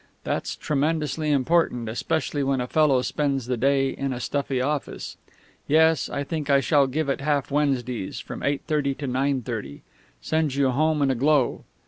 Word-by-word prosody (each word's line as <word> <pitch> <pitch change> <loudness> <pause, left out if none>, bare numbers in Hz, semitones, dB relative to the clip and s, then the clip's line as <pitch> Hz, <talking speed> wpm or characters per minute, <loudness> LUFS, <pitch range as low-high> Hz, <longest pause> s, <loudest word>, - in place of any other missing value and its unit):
That's - - -2
tremendously 155 +1 -1
important, 140 -4 +1
especially 140 +6 -1
when 135 -1 +1
a 125 - -1
fellow 140 -2 +3
spends 140 -4 -1
the 125 +1 -1
day 135 +2 +2
in 135 -1 -3
a 120 - -5
stuffy 140 0 -2
office. 140 +2 -3 0.5
Yes, 160 0 +3
I 140 - -2
think 150 -1 -4
I 140 -1 +5
shall 140 0 +3
give 150 +3 -2
it 135 - -1
half 145 -1 0
Wednesdays, 125 -7 -1
from - - -7
eight 140 0 -1
thirty 145 -3 0
to 145 - -6
nine 130 0 0
thirty; 110 - -6 0.4
sends 155 -4 0
you 140 -2 +2
home 155 +2 +1
in 135 - +3
a - - 0
glow. 140 +1 +1
140 Hz, 175 wpm, -24 LUFS, 130-150 Hz, 0.5 s, I